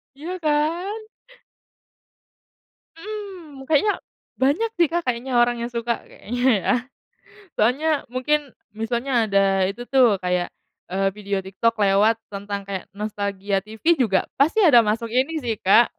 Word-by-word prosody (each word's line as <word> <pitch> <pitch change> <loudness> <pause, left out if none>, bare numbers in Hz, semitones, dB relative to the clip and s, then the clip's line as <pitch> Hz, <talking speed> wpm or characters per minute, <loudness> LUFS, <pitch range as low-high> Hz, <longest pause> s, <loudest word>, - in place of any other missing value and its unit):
Iya 345 +6 -6
kan? 335 +8 0 1.9
Mhm, 365 -8 -8
kayaknya 320 +7 +3 0.5
banyak 295 +13 +2
sih, 340 -2 +4
Kak, 345 0 +1
kayaknya 250 +1 -2
orang 240 0 +2
yang 235 +1 -4
suka, 235 0 -2
kayaknya 245 +3 -6 0.2
ya. - - +1 0.9
Soalnya 255 +9 +2 0.2
mungkin 285 +1 0 0.3
misalnya 235 +4 -2
ada 200 -2 +2 0.3
itu 220 +5 -6
tuh 235 -7 +5
kayak, 180 -1 0 0.4
eee, 195 0 +1
video 200 -1 -3
TikTok 210 +5 0
lewat 205 +3 +4 0.2
tentang 200 0 -4
kayak 190 -2 -4
nostalgia 200 -2 -2
TV 220 +4 -13 0.2
juga 195 -6 +2 0.2
pasti 320 +10 +4
ada 245 -8 +8
masuk 225 +2 -1
ini 260 +5 +1
sih, 230 -2 0
Kak, 225 +5 +5
240 Hz, 130 wpm, -23 LUFS, 205-300 Hz, 1.9 s, ada